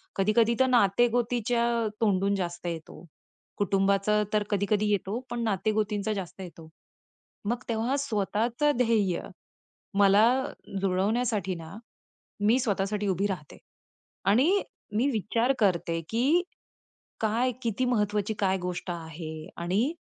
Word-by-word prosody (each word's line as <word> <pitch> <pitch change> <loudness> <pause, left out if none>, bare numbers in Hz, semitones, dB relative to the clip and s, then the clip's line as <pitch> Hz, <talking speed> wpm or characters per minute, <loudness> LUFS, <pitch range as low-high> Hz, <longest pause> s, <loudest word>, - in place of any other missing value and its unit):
कधी 195 +2 +2
कधी 230 0 +5
तर 260 - +5
नाते-गोतीच्या 240 +1 +2 0.4
तोंडून 200 -1 +2
जास्त 175 -2 -4
येतो. 165 +1 -7 0.5
कुटुंबाचं 200 +2 +2
तर 210 -1 +3
कधी 200 0 +1
कधी 210 0 +2
येतो 205 +2 -1
पण 240 -1 -2
नाते-गोतींचा 215 0 0
जास्त 190 -1 -6
येतो. 165 -3 -10 0.8
मग 240 +3 -2
तेव्हा 230 +4 0
स्वतःचं 235 +3 0
ध्येय 220 -7 +2 0.8
मला 200 +2 +6 0.6
जुळवण्यासाठी 195 +1 0
ना 165 +3 -9 0.7
मी 220 +5 +4
स्वतःसाठी 205 -2 -1
उभी 195 +2 +1
राहते. 180 -7 -5 0.7
आणि 280 - +4 0.3
मी 250 +5 +3
विचार 230 +3 +1
करते 170 -4 +1
की 275 +10 +3 0.8
काय 230 +4 +1
किती 235 +3 0
महत्वाची 210 -3 0
काय 190 -1 +2
गोष्ट 180 0 -4
आहे 160 -1 -7
आणि 195 - 0
210 Hz, 115 wpm, -28 LUFS, 190-235 Hz, 0.8 s, मला